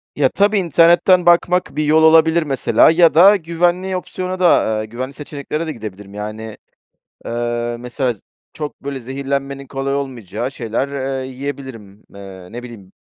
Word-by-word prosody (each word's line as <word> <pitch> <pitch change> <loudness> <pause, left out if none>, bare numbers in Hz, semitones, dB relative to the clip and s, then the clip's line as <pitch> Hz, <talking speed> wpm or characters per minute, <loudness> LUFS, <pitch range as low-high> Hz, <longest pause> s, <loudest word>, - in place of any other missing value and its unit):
Ya, 140 -3 +2
tabii, 205 +5 +2
internetten 175 +1 +4
bakmak 175 +1 +2
bir 155 - 0
yol 155 +1 +4
olabilir, 160 +1 +5
mesela. 135 0 +3
Ya 165 0 +4
da 190 +6 +7
güvenli 175 +2 -1
opsiyona 185 0 -5
da, 175 -2 +4
ııı, 110 - -3
güvenli 125 +5 -6
seçeneklere 150 +2 -5
de 155 - -3
gidebilirim, 105 -4 -9
yani, 110 +1 -7 0.7
eee, 120 0 -2
mesela, 125 +1 -2
z 105 - -21 0.3
çok 150 -5 -7
böyle 140 -1 -4
zehirlenmenin 140 +2 -4
kolay 135 +1 -3
olmayacağı 125 -4 -4
şeyler, 115 +1 -3 0.3
eee, 130 - -6
yiyebilirim. 130 -7 -8
Eee, 95 -2 -11
ne 120 +1 -8
bileyim, 110 -6 -12
140 Hz, 150 wpm, -18 LUFS, 120-165 Hz, 0.7 s, da